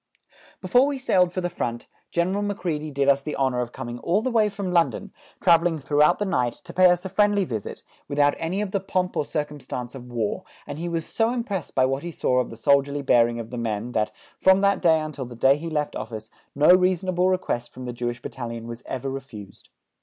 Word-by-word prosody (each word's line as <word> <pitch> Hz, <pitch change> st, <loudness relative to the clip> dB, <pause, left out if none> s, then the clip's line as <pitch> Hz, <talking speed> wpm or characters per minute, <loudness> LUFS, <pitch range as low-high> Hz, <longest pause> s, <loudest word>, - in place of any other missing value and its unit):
Before 250 Hz, +3 st, +4 dB
we 285 Hz, -1 st, -2 dB
sailed 185 Hz, -9 st, +2 dB
for 185 Hz, -, -3 dB
the 175 Hz, -, 0 dB
front, 120 Hz, -8 st, -3 dB, 0.2 s
General 185 Hz, +4 st, 0 dB
Macready 175 Hz, -7 st, -2 dB
did 140 Hz, -1 st, 0 dB
us 140 Hz, 0 st, +4 dB
the 150 Hz, +2 st, -4 dB
honour 130 Hz, -2 st, 0 dB
of 120 Hz, -1 st, -2 dB
coming 120 Hz, -2 st, -6 dB
all 190 Hz, -, +1 dB
the 255 Hz, -, 0 dB
way 220 Hz, -3 st, +3 dB
from 200 Hz, -2 st, -4 dB
London, 175 Hz, +3 st, +1 dB, 0.3 s
travelling 170 Hz, -2 st, +4 dB
throughout 145 Hz, +1 st, +3 dB
the 205 Hz, -, -1 dB
night, 125 Hz, -10 st, 0 dB
to 170 Hz, -1 st, -13 dB
pay 185 Hz, 0 st, +6 dB
us 175 Hz, +1 st, +1 dB
a -, -, -1 dB
friendly 205 Hz, +1 st, +2 dB
visit, 110 Hz, -, -5 dB, 0.2 s
without 145 Hz, 0 st, +3 dB
any 175 Hz, +5 st, -2 dB
of 205 Hz, -2 st, -3 dB
the 200 Hz, -, 0 dB
pomp 185 Hz, -1 st, -2 dB
or 150 Hz, -, 0 dB
circumstance 145 Hz, -5 st, -5 dB
of 125 Hz, -2 st, -9 dB
war, 120 Hz, -, -2 dB, 0.2 s
and 145 Hz, +1 st, -7 dB
he 175 Hz, +1 st, -3 dB
was 165 Hz, -1 st, -2 dB
so 225 Hz, 0 st, 0 dB
impressed 225 Hz, -, -4 dB
by 130 Hz, -, +4 dB
what 135 Hz, +1 st, -1 dB
he 175 Hz, -, -5 dB
saw 125 Hz, -5 st, +1 dB
of 125 Hz, -, -1 dB
the 115 Hz, -, -10 dB
soldierly 140 Hz, +3 st, +2 dB
bearing 120 Hz, -2 st, +3 dB
of 115 Hz, 0 st, -7 dB
the 120 Hz, -, -4 dB
men 115 Hz, 0 st, -3 dB
that, 110 Hz, -2 st, 0 dB, 0.3 s
from 190 Hz, +1 st, +5 dB
that 200 Hz, 0 st, +2 dB
day 160 Hz, -3 st, +4 dB
until 155 Hz, -3 st, -5 dB
the 120 Hz, 0 st, -10 dB
day 135 Hz, +4 st, +4 dB
he 165 Hz, +3 st, -5 dB
left 150 Hz, -2 st, -2 dB
office, 110 Hz, -1 st, -7 dB, 0.2 s
no 150 Hz, +4 st, +6 dB
reasonable 185 Hz, 0 st, +2 dB
request 120 Hz, -10 st, -1 dB
from 130 Hz, 0 st, -9 dB
the 125 Hz, -, -4 dB
Jewish 120 Hz, +1 st, -4 dB
Battalion 115 Hz, -2 st, -6 dB
was 120 Hz, +1 st, -7 dB
ever 130 Hz, +1 st, -4 dB
refused. 125 Hz, -8 st, -9 dB
150 Hz, 220 wpm, -24 LUFS, 125-185 Hz, 0.3 s, pay